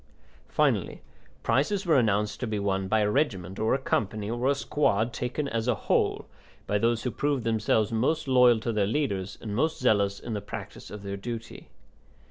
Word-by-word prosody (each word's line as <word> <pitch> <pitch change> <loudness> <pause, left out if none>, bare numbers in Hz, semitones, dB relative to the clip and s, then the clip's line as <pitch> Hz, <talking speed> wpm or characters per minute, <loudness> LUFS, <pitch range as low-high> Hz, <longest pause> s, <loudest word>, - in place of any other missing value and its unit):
Finally - - 0 0.4
prizes 150 - +1
were 165 - +4
announced 105 -4 +2
to 125 - -2
be 110 -1 -2
won 95 -1 -1
by 110 +2 +2
a 105 - +2
regiment 100 - -1
or 110 +3 +2
a - - +1
company 110 -5 -1
or 120 +3 0
a 140 - +3
squad 120 -6 +1
taken 125 +6 -2
as 115 -2 -2
a 125 - +3
whole, - - 0 0.4
by 105 - 0
those 115 +1 +1
who 125 - -1
proved 140 +2 -1
themselves 110 -1 +1
most 130 +8 0
loyal 125 -3 +5
to 115 +1 -2
their 105 -2 +1
leaders 100 -7 -1
and 105 -2 -4
most 155 +7 +1
zealous 100 -5 +2
in 115 - -6
the 105 - -2
practice 100 - -8
of 105 0 -8
their 100 0 -4
duty. 115 +2 -7
110 Hz, 190 wpm, -27 LUFS, 105-125 Hz, 0.4 s, loyal